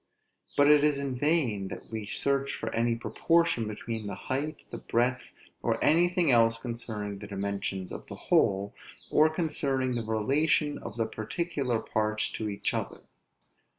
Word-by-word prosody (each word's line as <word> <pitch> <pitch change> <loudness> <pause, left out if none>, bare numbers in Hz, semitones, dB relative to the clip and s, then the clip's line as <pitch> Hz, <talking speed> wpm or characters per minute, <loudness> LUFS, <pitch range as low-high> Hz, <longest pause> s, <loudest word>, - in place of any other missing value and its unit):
but 145 - +6
it 150 -1 +6
is 150 -2 +3
in 140 -2 -2
vain 125 - +1
that - - -8
we 110 -2 -4
search 140 +4 0
here - - -6
for - - -3
any 115 0 +2
proportion 165 0 +1
between 110 0 -5
the 100 - -4
height, 145 +4 -3
the - - -5
breadth, 125 +2 0 0.3
or - - +1
anything 175 0 +4
else 115 -1 +5
concerning 110 -4 -5
the 105 - -8
dimensions 100 -2 -3
of - - -8
the - - -7
whole, 100 +1 +2 0.4
or 155 +1 +5
concerning 140 -5 0
the 120 - -1
relation 140 +7 +1
of 105 - -8
the 115 - +1
particular 125 +2 -2
parts 110 0 -1
to 110 -1 -3
each 100 -1 -2
other. - - -4
120 Hz, 160 wpm, -29 LUFS, 110-145 Hz, 0.4 s, but